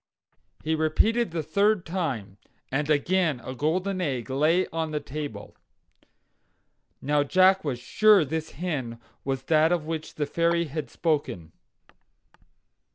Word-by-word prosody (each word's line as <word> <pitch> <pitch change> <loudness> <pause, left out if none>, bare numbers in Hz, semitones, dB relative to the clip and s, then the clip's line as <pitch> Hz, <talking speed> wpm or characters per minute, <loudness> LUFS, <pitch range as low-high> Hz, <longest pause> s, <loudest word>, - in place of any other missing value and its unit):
"Lay!" 160 - 0
he - - +3
repeated 215 +9 +2
the 165 -1 -3
third 200 +5 +2
time. 135 - -3 0.3
And 145 +3 -1
again 155 -1 +2
a 130 - -6
golden 185 +8 -1
egg 130 -6 -2
lay 155 +7 +3
on 160 -1 -2
the 150 -1 -2
table. 145 -8 -7 1.5
Now, 145 +2 +2
Jack 185 +5 +4
was 140 -5 -2
sure 200 - +4
this 160 +3 -4
hen 135 -8 -4 0.2
was 135 -1 -2
that 155 +2 +3
of 170 -3 0
which 155 -1 -5
the 150 - -1
fairy 170 +3 +1
had 155 0 -5
spoken. 145 - -2
155 Hz, 135 wpm, -26 LUFS, 140-175 Hz, 1.5 s, Jack